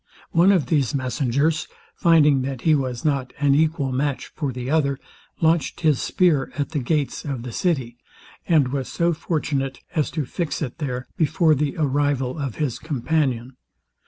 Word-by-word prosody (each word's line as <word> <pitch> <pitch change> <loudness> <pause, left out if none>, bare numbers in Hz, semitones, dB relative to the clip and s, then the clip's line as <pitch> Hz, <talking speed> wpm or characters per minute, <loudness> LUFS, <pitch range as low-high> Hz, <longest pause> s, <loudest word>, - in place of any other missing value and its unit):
One 175 +4 +5
of 180 -9 +3
these 140 -2 +1
messengers, 135 +4 0 0.3
finding 150 -5 +4
that 130 -1 -4
he 160 - +4
was 130 -4 -1
not 135 -4 0
an 140 -1 +3
equal 150 -2 +1
match 140 +1 -2
for 145 -4 -2
the 125 0 -6
other, 140 -2 +1 0.4
launched 165 0 +1
his 155 -6 +3
spear 165 -8 +2
at 145 - -1
the 150 - -2
gates 140 +2 -1
of 135 -5 -4
the 125 - -6
city, 130 -5 -1 0.5
and 155 -7 +4
was 135 -1 -3
so 170 0 +1
fortunate 145 -4 -2
as 155 -3 +1
to 150 - 0
fix 165 +4 -3
it 130 +1 -6
there 125 -4 -3
before 160 +1 +3
the 145 -1 -1
arrival 145 -2 0
of 135 -6 -3
his 145 -6 -2
companion. 135 -4 -1
145 Hz, 165 wpm, -23 LUFS, 130-155 Hz, 0.5 s, One